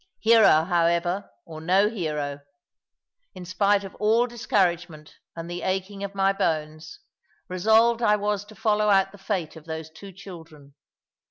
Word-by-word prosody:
Hero, 220 -8 +5
however, 170 +2 0 0.2
or 155 -1 -10
no 190 +5 +3
hero, 150 -9 -4 1.0
in 180 - -9
spite 200 +3 +1
of 195 - -9
all 220 +3 +3
discouragement 175 -9 -2 0.2
and 165 0 -7
the 175 0 -6
aching 195 +1 -3
of 200 0 -6
my 195 0 +2
bones, 155 -4 -3 0.5
resolved 220 +5 +3
I 210 -2 +4
was 205 -1 -2
to 215 +1 -15
follow 210 -1 +1
out 195 -1 +3
the 205 - -15
fate 185 -6 -3
of 160 -1 -13
those 160 -1 -7
two 195 +5 -12
children. 165 -7 -13
190 Hz, 150 wpm, -24 LUFS, 165-205 Hz, 1.0 s, Hero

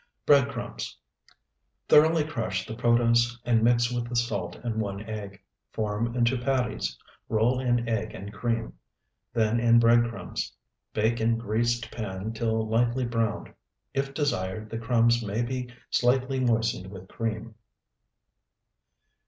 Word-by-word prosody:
Bread 140 -2 +5
crumbs. 120 -3 -6 0.9
Thoroughly 160 +1 +6
crush 110 -11 -3
the - - -6
protose 120 +1 +3
and 115 -2 +3
mix 120 +1 +3
with 120 -1 -2
the 120 - -4
salt 120 +1 -1
and 110 -2 -1
one 100 -1 -4
egg. 105 -2 -7 0.3
Form 110 +2 -2
into 120 +1 +2
patties, 125 - -1 0.3
roll 115 +3 +2
in 120 -2 +1
egg 110 -1 -2
and 100 +2 -8
cream, 115 +1 -2 0.6
then 115 0 +1
in 120 0 +5
bread 120 0 +5
crumbs. 115 - -5 0.4
Bake 110 +2 +1
in 115 +1 +2
greased 120 +1 -1
pan 105 -1 -4
till 110 -1 0
lightly 120 +3 +1
browned. 115 -3 -2 0.4
If 135 0 -1
desired, 110 -7 -2
the 115 - -3
crumbs 120 0 +3
may 110 +3 -1
be 125 0 -3 0.2
slightly 130 +2 +2
moistened 115 -5 +1
with 95 -1 -10
cream. 115 +1 -4
115 Hz, 135 wpm, -27 LUFS, 110-120 Hz, 0.9 s, Thoroughly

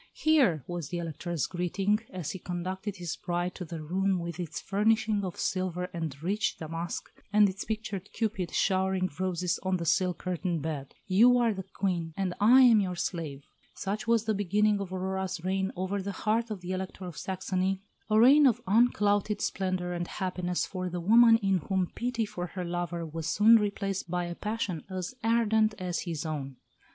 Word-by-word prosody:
"Here," 265 - +3
was 175 -5 -5
the 175 - -3
Elector's 170 -2 -3
greeting, 190 +5 0
as 180 -5 -4
he 190 - -6
conducted 185 +3 -4
his 175 -3 -4
bride 175 0 -2
to 180 - -6
her 160 -1 -6
room 190 +4 +1
with 170 -1 -5
its 170 -4 -4
furnishing 215 +1 +1
of 180 -2 -4
silver 180 -1 -2
and 160 -5 -4
rich 210 +4 0
damask, 165 +2 -5 0.2
and 210 -1 +6
its 190 0 -4
pictured 215 -3 -4
Cupid 195 -6 -2
showering 190 -1 +1
roses 180 -1 0
on 185 -1 0
the 170 - -4
silk 175 +1 +2
curtained 175 -3 -2
bed, 150 -4 -5
"you 230 +6 +5
are 235 -2 +3
the 190 - -5
Queen, 180 -4 -3
and 190 -2 -1
I 245 +6 +7
am 235 -4 +7
your 185 -3 -1
slave." 165 -5 -4 0.3
Such 205 +3 -3
was 230 -1 +3
the 220 - +1
beginning 205 +1 +2
of 190 -2 -5
Aurora's 190 0 -2
reign 190 +1 0
over 190 +2 -2
the 200 +1 -4
heart 225 +2 +1
of 210 -4 -5
the 180 +1 -5
Elector 185 0 -4
of 175 -3 -7
Saxony 190 +1 -2 0.3
a 215 0 +4
reign 275 +5 +7
of 240 - +2
unclouded 205 -1 +2
splendour 185 -3 -1
and 175 0 -3
happiness 180 -2 -2
for 185 -1 -4
the 175 0 -4
woman 225 +5 +6
in 195 -1 +2
whom 185 +2 -1
pity 235 -1 -1
for 180 -3 -5
her 180 +1 -5
lover 175 -1 -3
was 160 0 -5
soon 215 +7 +6
replaced 200 -3 -2
by 180 0 -1
a 175 - -4
passion 210 -4 -3
as 185 +3 -4
ardent 220 -1 +3
as 180 -2 -2
his 165 -3 -4
own. 140 -4 -4
185 Hz, 185 wpm, -29 LUFS, 175-210 Hz, 0.3 s, I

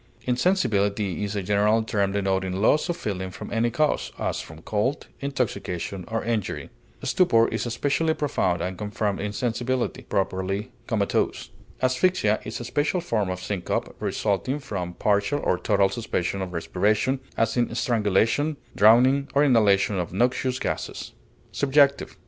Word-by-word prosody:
Insensibility 110 - +1
is 100 0 -3
a 100 - -2
general 105 +3 +2
term 100 -3 0
denoting 95 -2 0
loss 150 - +3
of 175 - -1
feeling 95 - -3
from 95 - -8
any 115 +1 +2
cause, 150 +5 0
as - - -2
from 80 +1 -12
cold, 110 +7 -1
intoxication, 100 -9 -3
or 115 0 -2
injury. 115 -4 -2 0.3
Stupor 115 -11 +4
is - - -2
especially 145 +7 0
profound 90 - 0
and 90 0 -4
confirmed 105 -1 -2
insensibility, 120 +5 -2
properly 95 +1 -2 0.2
comatose. 105 -4 -1 0.3
Asphyxia 130 - +2
is 110 - -5
a - - -5
special 145 +8 0
form 110 - -1
of 90 0 -4
syncope 95 -4 -3
resulting 110 +7 -1
from 90 -10 -5
partial 105 +7 +1
or 90 - +1
total 100 -2 +3
suspension 100 -5 -2
of 95 -1 -4
respiration, 105 +9 0 0.2
as 115 0 +1
in 120 -1 +1
strangulation, 120 +5 +1 0.2
drowning, 130 +6 +5
or 140 - +5
inhalation 105 -7 +3
of 85 - -3
noxious 125 +5 +1
gases. - - -4 0.4
SUBJECTIVE. 140 0 +2
110 Hz, 140 wpm, -25 LUFS, 100-130 Hz, 0.4 s, drowning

